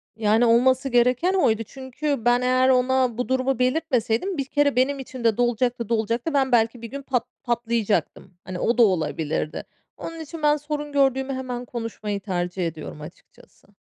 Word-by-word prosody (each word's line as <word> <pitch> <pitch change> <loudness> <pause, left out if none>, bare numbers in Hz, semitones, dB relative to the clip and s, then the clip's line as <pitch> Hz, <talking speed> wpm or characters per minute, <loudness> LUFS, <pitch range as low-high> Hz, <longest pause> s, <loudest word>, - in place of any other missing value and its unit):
Yani, 220 +2 +3
olması 255 +3 +3
gereken 250 +9 +3
oydu. 225 - +2
Çünkü 265 +2 -4
ben 240 +1 +4
eğer 255 +1 +3
ona 255 -2 +2
bu 250 - -3
durumu 260 -1 0
belirtmeseydim, 255 - 0
bir 275 - -1
kere 285 0 +1
benim 270 +2 +1
içimde 240 -4 -1
dolacaktı, 240 -1 0
dolacaktı, 230 +6 -1
ben 270 -2 +2
belki 230 0 +2
bir 230 - -6
gün 280 +1 -6
pat 255 -4 -1 0.2
patlayacaktım. 230 -5 -1
Hani, 185 -1 -6
o 235 - +1
da 240 - +7
olabilirdi. 160 -5 -1 0.3
Onun 330 0 -7
için 320 0 -8
ben 295 0 +4
sorun 295 0 -5
gördüğümü 270 -1 +1
hemen 250 -1 -5
konuşmayı 225 -4 -4
tercih 180 -2 -2
ediyorum 155 -1 -8
açıkçası. 160 +4 -15
245 Hz, 160 wpm, -24 LUFS, 225-270 Hz, 0.3 s, da